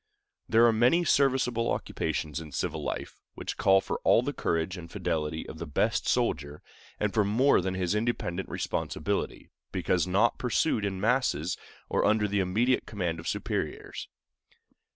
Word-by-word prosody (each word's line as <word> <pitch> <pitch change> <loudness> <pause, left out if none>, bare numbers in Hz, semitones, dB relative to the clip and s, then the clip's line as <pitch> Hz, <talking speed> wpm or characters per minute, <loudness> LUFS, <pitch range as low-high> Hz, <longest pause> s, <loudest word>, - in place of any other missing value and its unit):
There 115 +1 +6
are 115 - +5
many 125 +10 +3
serviceable 130 -5 +2
occupations 80 -1 -2
in 80 -3 -10
civil - - -2
life - - -5
which - - -5
call 95 0 +4
for - - -3
all 120 - +5
the 145 +3 -2
courage 85 -3 -1
and 85 -2 -9
fidelity 80 -1 -2
of 80 - -9
the 85 - -5
best 75 - 0
soldier, 70 +2 0 0.4
and 105 -1 0
for 110 - +3
more 115 +5 +3
than 95 +1 -2
his 90 0 0
independent 105 -5 -2
responsibility, - - -3 0.2
because - - 0
not 100 +6 +2
pursued 125 -3 +1
in 95 -2 -2
masses 110 - +1 0.3
or - - +1
under 105 0 +3
the 100 0 0
immediate 110 +8 +1
command 90 -6 -2
of 80 - -7
superiors. - - -3
100 Hz, 155 wpm, -28 LUFS, 85-120 Hz, 0.4 s, There